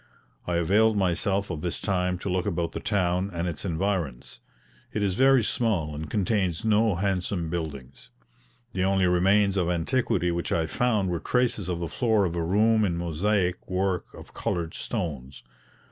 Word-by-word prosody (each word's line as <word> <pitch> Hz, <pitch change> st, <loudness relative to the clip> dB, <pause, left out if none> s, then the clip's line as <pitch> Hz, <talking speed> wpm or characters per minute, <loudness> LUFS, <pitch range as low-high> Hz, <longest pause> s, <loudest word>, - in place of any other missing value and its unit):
I 90 Hz, -, 0 dB
availed 105 Hz, +6 st, +3 dB
myself 95 Hz, +1 st, 0 dB
of 75 Hz, -, -4 dB
this 90 Hz, 0 st, -2 dB
time 90 Hz, -2 st, 0 dB
to 90 Hz, -, -7 dB
look 90 Hz, +1 st, 0 dB
about 85 Hz, -3 st, -1 dB
the -, -, -5 dB
town 90 Hz, -2 st, 0 dB
and 85 Hz, 0 st, -2 dB
its 80 Hz, -4 st, -4 dB
environs. 85 Hz, -7 st, -2 dB, 0.5 s
It 105 Hz, -, -1 dB
is 95 Hz, -2 st, +1 dB
very 130 Hz, +2 st, +4 dB
small 100 Hz, -10 st, 0 dB
and 75 Hz, +1 st, -6 dB
contains 95 Hz, -2 st, 0 dB
no 110 Hz, -2 st, +3 dB
handsome 90 Hz, -2 st, -1 dB
buildings. 70 Hz, -8 st, -6 dB, 0.6 s
The 90 Hz, -, 0 dB
only 95 Hz, -1 st, +2 dB
remains 95 Hz, +3 st, +3 dB
of 90 Hz, -2 st, +1 dB
antiquity 90 Hz, +1 st, 0 dB
which 85 Hz, 0 st, -3 dB
I 80 Hz, -, +1 dB
found 105 Hz, +1 st, 0 dB
were 85 Hz, -, -1 dB
traces 115 Hz, -2 st, 0 dB
of 85 Hz, -2 st, -2 dB
the 85 Hz, -, -2 dB
floor 110 Hz, +4 st, +1 dB
of 85 Hz, -1 st, -2 dB
a 85 Hz, -, -1 dB
room 110 Hz, +5 st, +3 dB
in 90 Hz, -4 st, 0 dB
Mosaic 90 Hz, +2 st, -1 dB
work 95 Hz, -1 st, -1 dB
of -, -, -13 dB
coloured 85 Hz, -2 st, -2 dB
stones. 75 Hz, -, -5 dB
90 Hz, 170 wpm, -26 LUFS, 85-100 Hz, 0.6 s, very